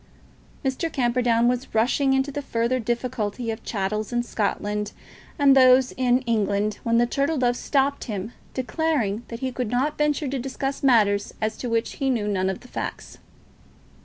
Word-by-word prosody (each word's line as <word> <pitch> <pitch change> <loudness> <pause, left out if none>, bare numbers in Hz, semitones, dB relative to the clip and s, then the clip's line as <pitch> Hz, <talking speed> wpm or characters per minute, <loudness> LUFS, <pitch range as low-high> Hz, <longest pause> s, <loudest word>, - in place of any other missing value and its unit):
Mr. 270 +5 -1
Camperdown 240 -2 +2
was 250 0 -1
rushing 265 +4 +3
into 265 +1 +1
the 290 - -4
further 235 -1 0
difficulty 235 -1 -2
of 220 - -5
the - - -27
chattels 210 +1 -2
in 240 0 0
Scotland 210 -2 -2 0.4
and 280 -3 +5
those 255 -1 +6
in 250 0 +2
England, 210 -3 0
when 230 0 +1
the 240 - +4
Turtle 280 +5 0
Dove 245 -2 +2
stopped 280 +2 0
him, 210 -1 -4 0.2
declaring 255 -4 0
that 230 +1 -7
he 260 -1 -1
could 250 -3 -3
not 270 +6 0
venture 300 0 +1
to 265 0 -2
discuss 270 +2 -3
matters 210 -6 +3
as 215 0 -1
to 245 - -4
which 230 0 -1
he 270 - +2
knew 225 -5 0
none 190 -2 0
of 190 - -4
the 250 - -14
facts. - - -6
245 Hz, 175 wpm, -24 LUFS, 220-265 Hz, 0.4 s, those